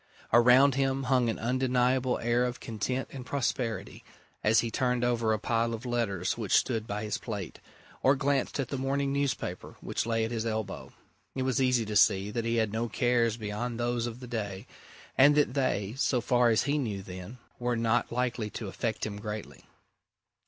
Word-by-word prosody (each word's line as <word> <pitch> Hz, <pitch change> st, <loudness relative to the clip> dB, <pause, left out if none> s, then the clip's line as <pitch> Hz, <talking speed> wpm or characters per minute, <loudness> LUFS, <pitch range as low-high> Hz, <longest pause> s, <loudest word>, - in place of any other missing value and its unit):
Around 125 Hz, +4 st, +7 dB
him 135 Hz, 0 st, 0 dB
hung 125 Hz, -2 st, +2 dB
an 110 Hz, -, -2 dB
undeniable 125 Hz, +1 st, +1 dB
air 120 Hz, +1 st, +1 dB
of 125 Hz, -1 st, -4 dB
content 125 Hz, +4 st, -3 dB
and 130 Hz, -2 st, -7 dB
prosperity 120 Hz, -7 st, -2 dB, 0.4 s
as 105 Hz, 0 st, +4 dB
he 115 Hz, -, -3 dB
turned 125 Hz, 0 st, 0 dB
over 120 Hz, -2 st, +1 dB
a 110 Hz, -, +2 dB
pile 115 Hz, +2 st, 0 dB
of 115 Hz, +3 st, -10 dB
letters 105 Hz, -7 st, -1 dB
which 105 Hz, -4 st, +1 dB
stood 115 Hz, -3 st, 0 dB
by 105 Hz, +1 st, -3 dB
his 105 Hz, -, -2 dB
plate, 100 Hz, -7 st, -6 dB, 0.4 s
or 135 Hz, +2 st, +5 dB
glanced 140 Hz, 0 st, 0 dB
at 135 Hz, -, -1 dB
the 140 Hz, -, -3 dB
morning 135 Hz, +1 st, 0 dB
newspaper 140 Hz, -10 st, -2 dB
which -, -, -3 dB
lay 115 Hz, -1 st, +1 dB
at 115 Hz, -, -5 dB
his 115 Hz, -2 st, -2 dB
elbow, 110 Hz, -3 st, -4 dB, 0.4 s
it 130 Hz, -, -1 dB
was 130 Hz, 0 st, +1 dB
easy 125 Hz, -3 st, +2 dB
to 105 Hz, 0 st, -4 dB
see 100 Hz, 0 st, +4 dB
that 115 Hz, +1 st, -2 dB
he 115 Hz, 0 st, 0 dB
had 110 Hz, -2 st, +1 dB
no 115 Hz, +1 st, -1 dB
cares 120 Hz, -1 st, +1 dB
beyond 115 Hz, +2 st, -4 dB
those 120 Hz, 0 st, 0 dB
of 120 Hz, +2 st, -7 dB
the 125 Hz, -, -8 dB
day, 105 Hz, -3 st, -4 dB, 0.5 s
and 145 Hz, +2 st, +7 dB
that 145 Hz, -4 st, +3 dB
they 115 Hz, -7 st, 0 dB
so 135 Hz, -1 st, +1 dB
far 120 Hz, 0 st, +3 dB
as 110 Hz, -, +3 dB
he 145 Hz, +1 st, 0 dB
knew 105 Hz, -7 st, -3 dB
then 95 Hz, +5 st, -9 dB, 0.2 s
were 120 Hz, -1 st, 0 dB
not 115 Hz, +1 st, +1 dB
likely 120 Hz, -2 st, -1 dB
to 110 Hz, -, -6 dB
affect 110 Hz, +3 st, -3 dB
him 105 Hz, -1 st, -5 dB
greatly. 105 Hz, -, -7 dB
120 Hz, 190 wpm, -29 LUFS, 110-130 Hz, 0.5 s, Around